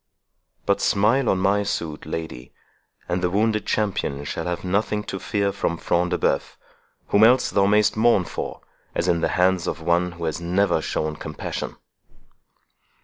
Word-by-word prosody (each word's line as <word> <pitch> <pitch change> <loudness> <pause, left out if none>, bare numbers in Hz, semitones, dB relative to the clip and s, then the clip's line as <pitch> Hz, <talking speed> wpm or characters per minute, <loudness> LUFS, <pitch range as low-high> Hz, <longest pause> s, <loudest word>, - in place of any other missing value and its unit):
But 100 - +1
smile 115 +6 +2
on 95 - +2
my 100 +2 +2
suit, 80 -6 -4
lady, 80 -7 -6 0.6
and 90 +1 -1
the 90 - +1
wounded 110 +3 0
champion 95 -9 -1
shall 80 +3 -4
have 90 0 -3
nothing 105 +3 0
to 95 - -5
fear 100 0 0
from 85 -3 -2
Front 85 +2 0
de - - 0
Bœuf, - - 0 0.5
whom 100 - +4
else 125 +3 +5
thou 100 -1 +3
mayst 105 +1 +3
mourn 110 -3 +4
for, - - -6 0.3
as - - 0
in 85 -1 +2
the - - +2
hands 90 -1 +2
of - - -2
one 85 +2 +1
who 85 -1 -9
has 80 0 -2
never 90 0 +1
shown 80 0 -2
compassion." 75 -1 -5
95 Hz, 165 wpm, -23 LUFS, 85-105 Hz, 0.6 s, else